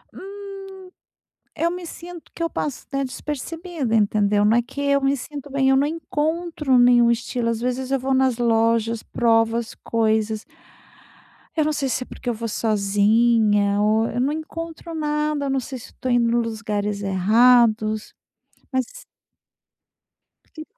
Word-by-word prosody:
Hum, 395 0 -9 0.9
eu 335 +2 0
me 360 0 -6
sinto 345 0 -10
que 335 - -3
eu 335 - 0
passo 290 -5 -4
até 275 0 -2
despercebida, 295 0 -4
entendeu? 205 -1 +2
Não 215 +3 +4
é - - +4
que 260 +4 -8
eu 280 0 +2
me 275 +1 +2
sinto 285 +3 -8
bem, 270 -1 +1
eu 270 - +5
não 280 +2 +2
encontro 315 -2 -1
nenhum 245 -1 +6
estilo. 235 0 -1
Às 230 -1 -2
vezes 250 +1 -2
eu 270 - +3
vou 265 +1 -1
nas 260 -2 +2
lojas, 230 -1 +1
provo 225 -1 +2
as 235 -1 -3
coisas 220 -1 0 1.1
eu 315 - +2
não 305 - 0
sei 280 -2 -1
se 255 +1 -1
é - - -15
porque - - -11
eu - - 0
vou 230 +1 -5
sozinha 210 0 +2
ou 220 +2 +2
eu 245 - -3
não 270 +4 +1
encontro 330 +1 -7
nada, 300 -1 -1
eu - - -2
não 270 - +1
sei 260 +2 -6
se 235 - -12
eu - - -29
tô 255 - -2
indo 240 -1 +3
nos 230 -2 0
lugares 210 -2 -2
errados, 215 +2 +3 0.6
mas 260 -1 0 1.7
Sim. 315 - -7
245 Hz, 165 wpm, -22 LUFS, 225-295 Hz, 1.7 s, nenhum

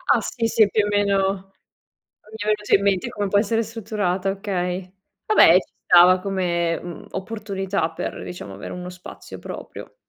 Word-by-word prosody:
Ah - - +2
sì, 230 -2 -2
sì 220 -1 +4
più 210 0 +2
o - - -2
meno 195 -1 0 0.8
mi 220 - -9
è - - -2
venuto 210 -1 +1
in 195 - +4
mente 195 -3 +1
come 205 -1 -2
può 200 - +3
essere 225 +2 +1
strutturata, 210 -4 -2
okay. 185 -2 -3 0.3
Vabbè 430 - +7
ci - - +1
stava 180 +1 +7
come, 175 -3 -1
mhmm, 175 -2 -9
opportunità 195 -4 -3
per - - -5
diciamo 140 - -8
avere 100 - -8
uno 180 0 -6
spazio 180 0 -11
proprio. - - -9
195 Hz, 165 wpm, -22 LUFS, 180-210 Hz, 0.8 s, Vabbè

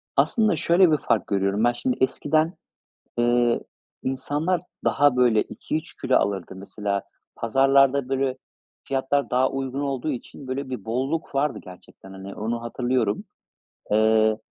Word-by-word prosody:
Aslında 220 -3 +3
şöyle 175 0 +4
bir 155 - +4
fark - - 0
görüyorum 100 +1 0
ben. 120 0 +4
Şimdi, 125 +1 -2
eskiden, 155 +5 +1 0.7
ııı, 120 0 +3 0.4
insanlar 150 +6 -1 0.2
daha, 145 -2 +3
böyle, 120 -4 +4
2-3 155 +2 -6
kilo 130 - +2
alırdı. 95 -2 -2
Mesela, 100 +1 -3 0.3
pazarlarda, 135 +2 +3
böyle, 135 -1 0 0.5
fiyatlar 135 +1 0
daha 130 +1 +2
uygun 135 0 -3
olduğu 140 0 -2
için, 130 +2 -8
böyle, 130 +1 -4
bir 125 -7 -6
bolluk 135 +8 -2
vardı 140 +1 0
gerçekten, 95 +1 -14
hani, 95 +1 -9
onu 115 +2 -3
hatırlıyorum. 120 -2 -1 0.7
Eee, 110 0 +4
130 Hz, 130 wpm, -24 LUFS, 110-140 Hz, 0.7 s, şöyle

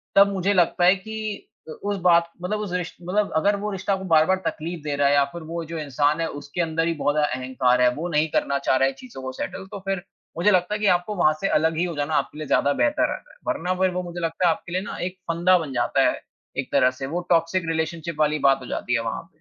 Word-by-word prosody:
तब 200 0 +7
मुझे 195 +1 +1
लगता 175 0 +3
है 185 +2 +6
कि 215 +1 -6 0.2
अ, - - -6
उस 205 0 -1
बात 170 -1 +4
मतलब 210 +4 -1
उस 205 -4 -5
रिश्त 180 -1 -3
मतलब 200 +4 0
अगर 200 +6 +3
वो 210 0 -2
रिश्ता 195 +1 -1
आपको 190 0 -3
बार-बार 160 +2 +4
तकलीफ़ 165 +1 -4
दे 150 -1 -2
रहा 140 0 +3
है 140 - +4
या 140 -1 +5
फिर 170 - -7
वो 170 +1 -4
जो 165 - -3
इंसान 145 +2 +1
है 165 - 0
उसके 145 +4 -5
अंदर 165 0 0
ही 170 - +1
बहुत 145 -1 0
ज़्यादा 150 -3 +1
अहंकार 130 -1 +1
है, 125 - +6
वो 165 +4 -3
नहीं 155 -1 +2
करना 140 0 +1
चाह 135 - +1
रहा 135 - +4
है 135 - -2
चीज़ों 240 - -10
को 130 - -4
सेटल 190 +8 -5
तो 205 - -6
फिर 195 -2 -1 0.3
मुझे 180 +5 +4
लगता 185 +1 +2
है - - -3
कि 210 - -1
आपको 175 +4 -3
वहाँ 155 -4 +4
से 195 - +1
अलग 160 +1 +2
ही 170 - +1
हो 170 -2 -4
जाना 145 +2 -1
आपके 150 - -1
लिए 155 -1 -5
ज़्यादा 145 +1 +3
बेहतर 305 - +2
रहता - - -7
है। - - -21
वरना 180 +2 0
फिर 185 - +4
वो 180 0 -3
मुझे 175 0 -6
लगता 165 +2 0
है - - +5
आपके 170 - -11
लिए 185 - 0
ना - - -6
एक 185 +1 -5
फंदा 175 +2 +4
बन 150 -5 -5
जाता 120 -1 +1
है, - - -4 0.4
एक 135 - -3
तरह 130 -2 +4
से - - -1
वो 170 +5 -2
टॉक्सिक 170 +1 +2
रिलेशनशिप 165 0 -2
वाली 150 0 +2
बात 135 - +3
हो 125 - -9
जाती 125 - -3
है 115 - +1
वहाँ 115 -1 -3
पे। - - -23
170 Hz, 275 wpm, -24 LUFS, 150-185 Hz, 0.4 s, तब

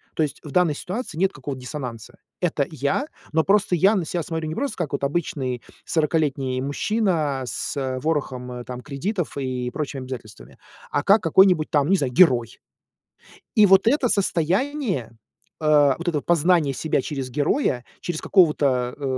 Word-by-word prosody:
То 160 - +2
есть, 145 -4 -4
в 150 - -9
данной 180 -2 +3
ситуации 190 - -5
нет 190 +2 +2
какого-то 135 -1 -6
диссонанса. 125 -5 -7 0.2
Это 155 -5 +1
я, 145 - -1 0.3
но 160 0 +3
просто 195 -1 +2
я 190 +5 +4
на 190 - 0
ся 170 +1 -2
смотрю 160 0 -4
не 160 - -4
просто 275 -1 -3
как 160 -6 -3
обычный 140 -4 -2 0.2
сорокалетний 145 -5 0
мужчина, 155 -1 0
а, - - -4
с, 125 - -4
э, 130 -1 -2
ворохом, 130 -4 -2
э, 125 0 -6
там, 125 0 -7
кредитов 165 - -4
и 130 -2 -2
прочими 140 -3 -4
обязательствами, 115 - -9 0.3
а 145 - 0
как 200 +5 +5
какой-нибудь, 175 -1 +4
там, 145 -2 +2
не 195 - +4
знаю, 135 -6 -2
герой. 125 -7 +4 1.0
И 215 - +7
вот 195 +1 +5
это 265 +1 +3
состояние, 195 - 0 0.5
э, 145 -3 +4
вот 170 - -8
это 155 -4 0
познание 170 -3 +2
себя 155 +1 0
через 135 -2 -4
героя, 145 - 0 0.2
через 175 -3 -4
какого-то, 140 -9 +2
э, 145 - -10
150 Hz, 165 wpm, -23 LUFS, 130-180 Hz, 1.0 s, И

